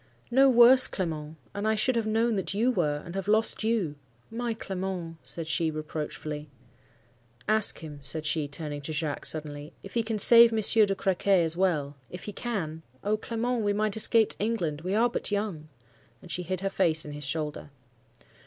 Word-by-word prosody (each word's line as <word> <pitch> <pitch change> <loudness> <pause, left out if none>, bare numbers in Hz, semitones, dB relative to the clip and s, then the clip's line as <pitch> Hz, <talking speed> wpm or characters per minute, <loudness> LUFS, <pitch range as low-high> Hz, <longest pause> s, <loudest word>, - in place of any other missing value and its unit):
"'No 270 +2 +5
worse, 250 +1 +7
Clement! 160 -4 -5 0.2
and 205 +1 -3
I 220 - +2
should 245 +4 +1
have 230 -2 -1
known 225 +1 +1
what 195 0 -3
you 235 +5 +2
were, 150 -9 -1
and 170 - -8
have 195 0 -4
lost 215 +1 +2
you. 210 -10 -1 0.3
My 235 0 -3
Clement!' 185 -5 -5
said 145 +6 -4
she, 160 +1 0
reproachfully. 155 -1 -6 1.0
"'Ask 215 0 +4
him,' 150 -2 -9
said 150 +3 -2
she, 155 -1 0
turning 145 0 -7
to 155 +3 -5
Jacques, 150 -1 -2
suddenly, 150 0 -4
'if 195 - -11
he 235 - +1
can 225 -1 -3
save 235 +2 +8
Monsieur 220 0 +4
de 195 - -1
Crequy 190 -1 +1
as 165 0 +1
well,—if 155 -3 -2
he 210 - -7
can?—O 160 - -4
Clement, 235 +2 -2
we 205 0 +1
might 210 0 0
escape 220 0 +3
to - - -7
England; 170 -10 -2
we 185 +4 -2
are 230 +3 +3
but 240 - -3
young.' 200 -7 -3 0.5
And 175 - -12
she 180 - -1
hid 185 +1 -4
her 195 0 -2
face 165 -5 +2
on 150 - -7
his 145 0 -7
shoulder. 150 0 -4
185 Hz, 185 wpm, -27 LUFS, 155-220 Hz, 1.0 s, save